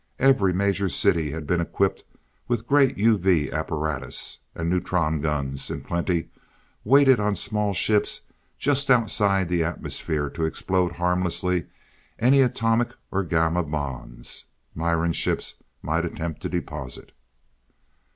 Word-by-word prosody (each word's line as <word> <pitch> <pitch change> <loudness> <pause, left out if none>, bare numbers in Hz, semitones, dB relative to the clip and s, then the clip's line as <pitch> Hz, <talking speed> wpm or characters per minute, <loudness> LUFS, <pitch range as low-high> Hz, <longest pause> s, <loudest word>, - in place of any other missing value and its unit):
Every 130 -8 +4
major 100 +1 +1
city 80 -2 +2
had 80 +1 -5
been 85 +3 +1
equipped 95 +3 -1 0.4
with 120 -2 -1
great 140 0 +4
UV 95 - +2
apparatus. 75 -4 -3 0.2
And 85 - -3
neutron 85 -3 0
guns 70 -3 -2
in - - -4
plenty 85 -1 -1 0.5
waited 135 0 +5
on 105 0 +1
small 105 -1 0
ships 105 +3 +2 0.4
just 140 0 +1
outside 100 -6 +3
the 85 -1 +1
atmosphere 80 -2 -2
to 80 - -2
explode 90 +2 0
harmlessly 90 0 0 0.5
any 135 +4 +5
atomic 115 -2 +1 0.2
or 100 +1 0
gamma 80 +1 +1
bombs 65 -6 -5 0.3
Miran 85 +1 0
ships - - -1 0.3
might 80 +2 0
attempt 85 -2 -4
to - - -3
deposit. 65 -2 -5
90 Hz, 120 wpm, -24 LUFS, 80-105 Hz, 0.5 s, waited